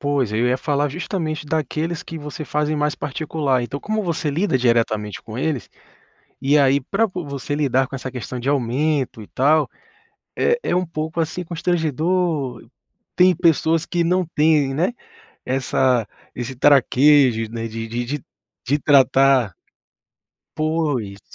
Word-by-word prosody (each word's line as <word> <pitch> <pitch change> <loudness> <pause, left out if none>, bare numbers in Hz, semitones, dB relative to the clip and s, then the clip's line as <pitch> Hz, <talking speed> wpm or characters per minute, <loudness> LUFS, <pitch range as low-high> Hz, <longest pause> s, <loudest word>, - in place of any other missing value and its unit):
Pois, 140 -6 0
eu 115 +3 +1
ia 125 +1 +2
falar 145 +1 0
justamente 155 -1 -4
daqueles 160 +2 -2
que 165 - -8
você 150 +1 -7
faz 150 +1 -1
em 155 - -1
mais 150 0 0
particular. 145 -3 -1
Então 140 +4 -5
como 215 0 -2
você 160 -4 -1
lida 165 -2 +1
diretamente 115 -4 0
com 110 +1 -8
eles, 140 -3 -2 0.7
e 140 +2 +3
aí 140 0 +3
pra 210 - 0
po 180 -3 -6
você 140 0 -4
lidar 135 -3 +1
com 135 - -7
essa 130 -1 -6
questão 125 0 -6
de 130 +3 -2
aumento 135 -1 0
e 105 - -11
tal, 150 +3 +2 0.7
é 475 0 +2
é - - 0
um 180 0 0
pouco, 160 +1 -3
assim, 175 +3 -2
constrangedor. 160 -5 -1 0.5
Tem 180 0 +5
pessoas 165 -1 +2
que 175 -1 0
não 180 +1 +1
têm, 150 -3 +3
né. 180 - +1 0.5
Essa 130 -3 +1 0.3
esse 125 +2 -5
traquejo, 135 -4 +4
né, 115 0 -4
de 115 0 -5
de 120 +2 -3
de 140 +2 -5 0.4
de 145 +4 +2
tratar 135 -6 +4 1.0
Pois. 150 -11 -1
145 Hz, 150 wpm, -21 LUFS, 130-160 Hz, 1.0 s, Tem